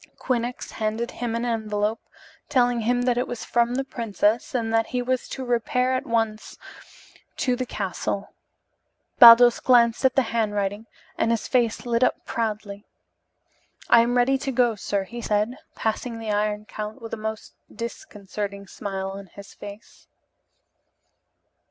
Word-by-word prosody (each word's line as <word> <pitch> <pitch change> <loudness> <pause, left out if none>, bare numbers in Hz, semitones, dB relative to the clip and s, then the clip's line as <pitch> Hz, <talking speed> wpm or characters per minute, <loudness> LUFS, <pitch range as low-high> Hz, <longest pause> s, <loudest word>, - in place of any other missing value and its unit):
Quinnox 245 -1 -2
handed 220 +3 -2
him 235 -2 -3
an 235 +1 -1
envelope, 215 -2 -1 0.5
telling 245 -4 +3
him 245 +2 +1
that 245 -1 +2
it 250 - -1
was 245 - -6
from 240 0 +1
the 270 - 0
princess 230 -2 -1
and 225 -2 -1
that 225 0 +2
he 250 - -2
was 255 +1 -1
to 265 - -5
repair 250 +1 +1
at 255 - -2
once 225 -2 -1 0.8
to 250 -2 +1
the 255 0 -4
castle, 200 0 -3 0.9
Baldos 235 0 +9
glanced 235 -2 +4
at 265 -1 +3
the 270 - +4
handwriting, 205 -1 -1 0.3
and 225 - +2
his 230 -2 0
face 240 -2 +1
lit 235 0 +1
up - - +1
proudly. 210 -3 -3 1.1
"I 235 - +8
am 240 +1 +1
ready 265 +2 +3
to 270 0 -3
go, 245 -2 +3
sir," 200 -1 -2
he 235 +5 -8
said, 215 +2 0 0.2
passing 230 +2 -2
the 225 -1 -4
Iron 210 0 -1
Count 215 +2 -6
with 230 -2 -9
a - - +1
most 220 0 -6 0.2
disconcerting 205 -3 -6
smile 195 -1 -5
on 195 0 -9
his 200 +2 -13
face. 205 +1 -12
230 Hz, 150 wpm, -24 LUFS, 210-245 Hz, 1.1 s, Baldos